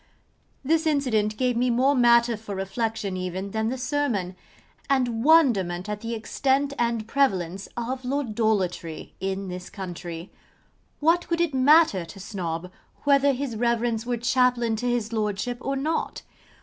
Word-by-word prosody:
This 320 Hz, +3 st, +2 dB
incident 220 Hz, -8 st, +1 dB
gave 250 Hz, 0 st, +1 dB
me 250 Hz, +2 st, +1 dB
more 255 Hz, +4 st, +3 dB
matter 235 Hz, -2 st, +4 dB
for 210 Hz, -2 st, -7 dB
reflection 200 Hz, +1 st, -2 dB
even 185 Hz, +2 st, -4 dB
than 220 Hz, +1 st, -1 dB
the 260 Hz, -, -3 dB
sermon: 250 Hz, -9 st, -1 dB, 0.5 s
and 245 Hz, -4 st, +1 dB
wonderment 210 Hz, -, +4 dB
at 210 Hz, 0 st, -4 dB
the 230 Hz, 0 st, -3 dB
extent 270 Hz, +5 st, 0 dB
and 235 Hz, -2 st, 0 dB
prevalence 195 Hz, -9 st, 0 dB
of 250 Hz, +2 st, -3 dB
Lordolatory 215 Hz, -, -1 dB
in 195 Hz, 0 st, -3 dB
this 180 Hz, 0 st, -7 dB
country. 175 Hz, -2 st, -7 dB, 0.7 s
What 335 Hz, +3 st, +3 dB
could 335 Hz, -1 st, -1 dB
it 340 Hz, -4 st, +1 dB
matter 265 Hz, -, +5 dB
to 170 Hz, +3 st, -11 dB
Snob 180 Hz, -3 st, -5 dB, 0.3 s
whether 280 Hz, 0 st, +4 dB
his 265 Hz, -2 st, -3 dB
Reverence 235 Hz, 0 st, 0 dB
were 240 Hz, 0 st, -2 dB
chaplain 240 Hz, -1 st, +2 dB
to 245 Hz, +3 st, -1 dB
his 235 Hz, -2 st, -1 dB
Lordship 215 Hz, +2 st, -2 dB
or 275 Hz, +1 st, -2 dB
not? 305 Hz, +4 st, -2 dB
235 Hz, 145 wpm, -25 LUFS, 195-265 Hz, 0.7 s, matter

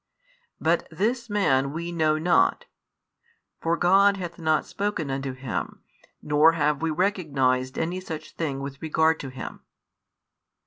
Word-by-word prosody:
But 165 Hz, +2 st, +1 dB
this 230 Hz, +8 st, -1 dB
Man 140 Hz, -10 st, +2 dB
we 170 Hz, +2 st, -4 dB
know 155 Hz, -2 st, +2 dB
not, 175 Hz, -, +2 dB, 0.9 s
for 165 Hz, +1 st, 0 dB
God 195 Hz, +3 st, +4 dB
hath 180 Hz, -2 st, -6 dB
not 155 Hz, -2 st, +1 dB
spoken 200 Hz, -8 st, -3 dB
unto 135 Hz, 0 st, -3 dB
Him, 130 Hz, -1 st, -5 dB, 0.4 s
nor 150 Hz, +2 st, +5 dB
have 150 Hz, -2 st, +1 dB
we 165 Hz, -, 0 dB
recognised 140 Hz, -8 st, 0 dB
any 175 Hz, +3 st, -1 dB
such 160 Hz, -4 st, -7 dB
thing 140 Hz, -5 st, -3 dB
with 140 Hz, 0 st, -7 dB
regard 160 Hz, 0 st, +2 dB
to 135 Hz, -, -6 dB
Him." 130 Hz, 0 st, -8 dB
160 Hz, 135 wpm, -25 LUFS, 140-180 Hz, 0.9 s, nor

